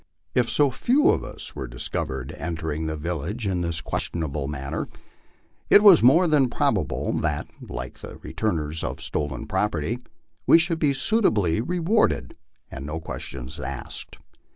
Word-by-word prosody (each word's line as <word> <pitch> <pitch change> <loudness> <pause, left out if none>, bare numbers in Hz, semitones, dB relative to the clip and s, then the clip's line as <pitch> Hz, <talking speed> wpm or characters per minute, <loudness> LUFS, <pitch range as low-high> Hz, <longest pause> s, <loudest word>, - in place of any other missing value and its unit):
If 125 -2 +2
so 145 -2 +3
few 260 - +3
of - - +2
us - - -4
were 65 - -5
discovered 65 +2 -3
entering 80 0 -3
the 80 0 -3
village 85 - -4
in 95 -3 0
this 85 0 -1
questionable 75 -4 -2
manner, 70 -2 -4 0.8
it 205 - +7
was 195 -6 +9
more 150 +9 +6
than 145 -5 +3
probable 115 - 0
that, 75 -2 -1 0.2
like - - -6
the - - -9
returners 80 -7 -2
of - - -4
stolen 75 -4 -3
property, 105 +2 -1 0.5
we - - +8
should 165 -1 +2
be 145 -3 +2
suitably 110 - +3
rewarded 180 - +1 0.4
and 70 - -7
no 80 +2 -4
ques 80 - -6
tions 65 -2 -7
asked. 65 0 -5
85 Hz, 150 wpm, -24 LUFS, -, 0.8 s, was